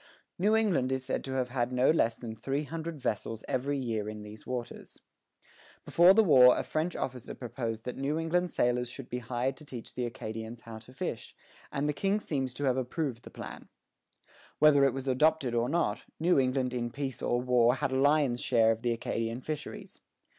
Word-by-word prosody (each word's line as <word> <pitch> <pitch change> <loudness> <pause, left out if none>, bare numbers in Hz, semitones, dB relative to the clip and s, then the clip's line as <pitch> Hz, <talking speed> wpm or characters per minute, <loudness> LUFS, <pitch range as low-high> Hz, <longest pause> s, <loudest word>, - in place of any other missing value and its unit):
New 210 +4 +3
England 185 -13 +2
is 130 0 -2
said 130 - -2
to 135 - -5
have 130 -1 -1
had 120 0 -1
no 125 +2 +4
less 115 -8 +2
than 115 -2 -7
three 135 +6 -2
hundred 160 +1 -5
vessels 110 -2 -3
every 140 +3 -1
year 110 -5 -2
in 105 -1 -7
these 105 0 -11
waters. 125 -2 -6 0.9
Before 175 +3 +6
the 220 - +6
war 130 -8 +7
a - - -1
French 160 +3 -2
officer 125 -2 -4
proposed 115 -3 -4
that 125 - -5
New 140 +3 -1
England 175 +2 0
sailors 125 -3 +1
should 125 +1 -9
be 125 - -3
hired 125 +2 -2
to - - -13
teach 125 -6 -9
the 125 -1 -2
Acadians 110 0 -6
how 115 -1 -9
to 110 +3 -16
fish, - - -5 0.4
and 140 +2 -1
the 150 - +1
King 195 +7 +1
seems 135 -9 -2
to 145 - -4
have 130 -2 +2
approved 130 -1 -2
the - - -11
plan. - - -9 0.9
Whether 145 -2 +6
it 135 - +2
was 135 0 -5
adopted 140 0 +2
or 120 +1 +1
not, 170 +4 0
New 170 -1 +4
England 130 -1 +1
in 120 -1 -2
peace 135 +1 -5
or 120 - +1
war 125 -1 +3
had 130 +1 -1
a - - -1
lion's 140 -4 +3
share 115 -3 +4
of 110 0 -2
the 120 -1 +1
Acadian 115 +1 -3
fisheries. 155 +2 -6
130 Hz, 200 wpm, -30 LUFS, 120-145 Hz, 0.9 s, war